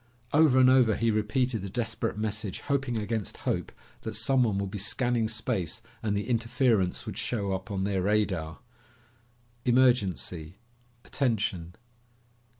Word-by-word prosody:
Over 150 -3 +5
and 130 -1 +7
over 130 -4 +5
he 115 -1 +1
repeated 110 +2 0
the 100 - -5
desperate 115 0 -2
message, 110 -2 -3
hoping 135 -4 -1
against 110 -1 -3
hope - - -1 0.3
that 110 -1 -5
someone 115 -2 +2
would 100 -1 -2
be 105 - -4
scanning 120 +2 +1
space 110 -6 -2 0.2
and 105 -2 0
the 100 - -3
interference 115 -5 +1
would - - -5
show 100 -5 -2
up 95 +2 -5
on 95 -2 -2
their 95 -1 0
radar. 95 -4 0 0.5
"... 120 0 -36
emergency... 95 - +1 0.5
attention 100 - -1
110 Hz, 140 wpm, -28 LUFS, 100-120 Hz, 0.5 s, and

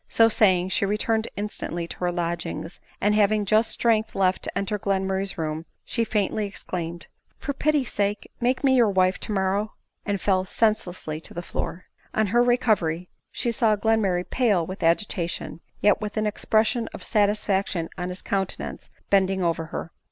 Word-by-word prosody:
So 225 0 +5
saying, 185 -5 +3
she 190 - +1
returned 220 +2 0
instantly 175 -4 -4
to - - -8
her 180 -1 0
lodgings; 170 -1 -3 0.2
and 205 +1 +2
having 210 0 +3
just 215 +3 +3
strength 220 -2 +1
left 190 -1 +2
to - - -4
enter 200 +1 -1
Glenmurray's 190 0 -1
room, 160 0 -3 0.2
she 235 - 0
faintly 210 -1 0
exclaimed: 170 -3 -5
— - - -49
" - - -40
For 280 - -3
pity's 290 -2 +1
sake 205 0 -1
make 250 +3 +1
me 265 -1 +5
your 235 -3 +5
wife 185 -1 +2
tomorrow 200 +1 -1
!" - - -54
and 200 -1 0
fell 185 -1 +2
senseless 210 -3 0
on 155 0 -3
the 175 - -6
floor. 180 +1 -4 0.3
On 220 - +3
her 240 - +6
recovery 215 -9 +2 0.2
she 240 - -1
saw 225 -3 +3
Glenmurray 205 -4 +1
pale 210 -10 +2
with 185 +3 -7
agita 170 +1 +1
tion, 170 - -5 0.2
yet 205 +1 +4
with 210 +1 -4
an 215 - +1
expression 220 +2 +1
of - - -9
satisfaction 200 -5 +1
in 180 0 -4
his 180 +1 -4
counte 195 -1 -1
nance, - - -7 0.2
bending 190 -1 +3
over 165 -1 0
her. 165 +1 -6
200 Hz, 180 wpm, -25 LUFS, 180-220 Hz, 0.3 s, her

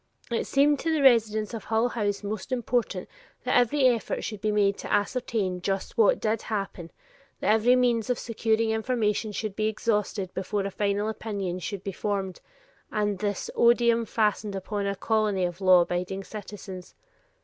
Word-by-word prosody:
It 230 - -1
seemed 285 +1 +3
to 325 - -1
the 310 -3 +1
residents 220 -4 +4
of 225 - -6
Hull 225 +2 +1
House 205 -4 -2
most 210 +3 -5
important 245 -1 -1 0.4
that - - 0
every 250 +3 +3
effort 235 -3 0
should 215 -3 -5
be 215 - +1
made 200 -1 +2
to - - -6
ascertain 205 -4 0
just 195 +1 -2
what 220 -3 +4
did 220 0 0
happen, 195 -5 -4 0.5
that 210 - +3
every 230 +3 +4
means 245 -2 +2
of 250 - +1
securing 225 -1 0
information 220 -2 0
should 210 -1 -4
be 215 0 0
exhausted 210 -3 -1
before 195 +1 -2
a 200 - -3
final 205 +1 0
opinion 200 -5 -3
should 195 +1 -5
be 195 - -3
formed, 195 -1 -3 0.5
and 205 -2 -1
this 205 -1 -2
odium 235 -1 +4
fastened 210 -2 0
upon 200 +1 -3
a 200 - -1
colony 210 -3 +1
of 175 +2 -5
law 185 -2 +7
abiding 180 +3 -2
citizens. 195 -3 -9
210 Hz, 170 wpm, -27 LUFS, 195-230 Hz, 0.5 s, law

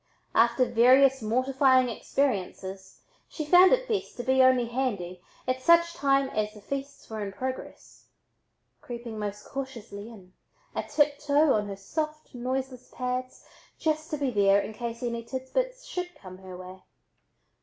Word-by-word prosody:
After 235 +2 +4
various 260 +3 +5
mortifying 255 +3 +3
experiences 195 -6 -3 0.3
she 310 - -5
found 360 +4 +7
it - - +2
best 430 -4 -2
to 245 - -4
be 260 +1 +3
"only 255 -2 +5
handy" 210 -8 -3 0.3
at 255 0 0
such 340 +3 +5
times 275 -3 +2
as 210 0 0
the - - -11
feasts 275 +4 -6
were 220 -1 -5
in 200 - -4
progress, 260 +5 -7 0.7
creeping 235 -2 -7
most 210 0 -5
cautiously 235 -6 -7
in, 190 -5 -14 0.4
a - - -1
tiptoe 295 0 +2
on 210 -1 0
her 200 - -5
soft 305 +10 -5
noiseless 255 0 -4
pads, 255 0 -4 0.3
just 310 0 -1
to 305 - -2
be 280 -3 -1
there 200 -2 +4
in 215 - -4
case 235 +1 -5
any 235 -1 -2
tidbits - - -3
should 360 -1 -5
come 185 -1 -12
her 185 -1 -10
way. 185 +1 -10
255 Hz, 150 wpm, -27 LUFS, 215-275 Hz, 0.7 s, found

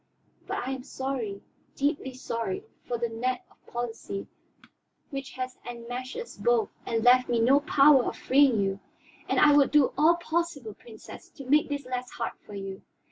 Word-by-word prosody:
But 245 - -3
I - - -1
am 265 -1 -5
sorry, 255 -7 -4 0.3
deeply 280 -2 -1
sorry, 255 - -3 0.2
for 240 - -1
the 235 0 -1
net 250 +3 -2
of - - -28
policy 230 -4 -4 0.9
which 275 -1 -5
has 255 -1 -5
enmeshed 245 +2 -6
us 475 0 -7
both 475 -3 +2 0.2
and 225 -1 0
left 250 +1 +6
me 240 -1 +2
no 260 +5 +5
power 285 -2 +5
of - - -3
freeing 265 -4 +4
you. 195 0 -1 0.5
And - - +2
I 295 -1 +7
would 285 -2 +5
do 295 -3 +4
all 320 +3 +6
possible, 335 -9 -2
Princess, 220 +1 -13
to 275 - -11
make 295 +4 +3
this 285 -2 -3
less 250 0 -4
hard 230 - -4
for 205 - -9
you. 195 -1 -6
255 Hz, 175 wpm, -28 LUFS, 235-285 Hz, 0.9 s, I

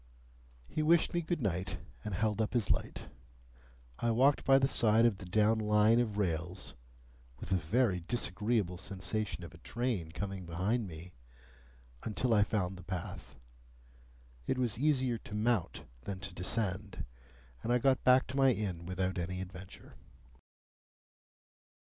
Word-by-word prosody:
He 155 - -2
wished 165 +2 +4
me 175 - +1
good 170 -4 -2
night, 90 -2 -1 0.3
and 105 -3 -3
held 110 +2 +1
up 110 - -1
his 115 -4 +2
light. - - -2 0.9
I 120 - +1
walked 130 +5 +4
by 135 0 +6
the 135 0 +3
side 115 -3 +4
of 105 -5 +2
the 95 - -9
down 110 +4 +3
Line 105 +2 +4
of 110 -4 -1
rails 90 -1 -2 0.7
(with 85 - -8
a - - +4
very 95 +4 +1
disagreeable 105 -1 -1
sensation 100 +1 -3
of 85 0 -9
a 85 - -14
train 115 -7 -2
coming 95 -1 -5
behind 100 +7 0
me) 85 +1 -10 0.9
until 115 +2 0
I 105 -2 +5
found 95 -3 -1
the 90 - -10
path. 90 -5 -6 1.1
It 130 - +1
was 125 -4 +1
easier 130 -5 +2
to 105 - -8
mount 110 -4 0 0.2
than 95 +7 -5
to 95 - -6
descend, 95 -3 -2 0.6
and 115 - -2
I 125 - +5
got 130 +1 +2
back 130 0 +6
to 130 - -5
my 135 -1 +5
inn 90 -6 -4
without 95 0 -1
any 90 +2 -3
adventure. 95 0 -10
105 Hz, 150 wpm, -33 LUFS, 90-120 Hz, 1.1 s, by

